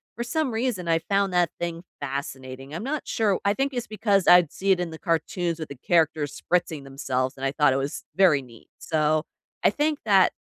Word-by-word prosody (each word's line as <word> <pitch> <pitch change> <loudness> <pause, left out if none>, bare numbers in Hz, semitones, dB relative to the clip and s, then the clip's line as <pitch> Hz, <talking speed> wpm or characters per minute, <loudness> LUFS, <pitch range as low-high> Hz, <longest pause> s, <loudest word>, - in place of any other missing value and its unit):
for 235 - -3
some 280 +2 -1
reason, 225 -6 -2
I 165 0 +3
found 195 +2 0
that 175 -2 +3
thing 170 -1 -3 0.2
fascinating. 135 0 -6
I'm 175 - -4
not 290 +4 -2
sure 210 -4 +1
I 200 - +4
think 270 +4 -1
it's 245 -2 -3
because 205 -3 +1
I'd 175 -3 +7
see 195 +1 0
it 185 - +3
in 175 - -2
the 160 - -9
cartoons 170 0 -1
with 155 - -6
the 140 - -8
characters 155 -1 +1 0.2
spritzing 165 -5 +1
themselves 130 -1 -2
and 135 - -4
I 135 - 0
thought 145 -1 +4
it - - +1
was 135 +1 -3
very 175 -7 +5
neat. 120 -3 -16
So, 155 -1 +1 0.4
I - - +6
think 300 0 0
that 195 -4 +5
170 Hz, 210 wpm, -25 LUFS, 145-200 Hz, 0.4 s, I'd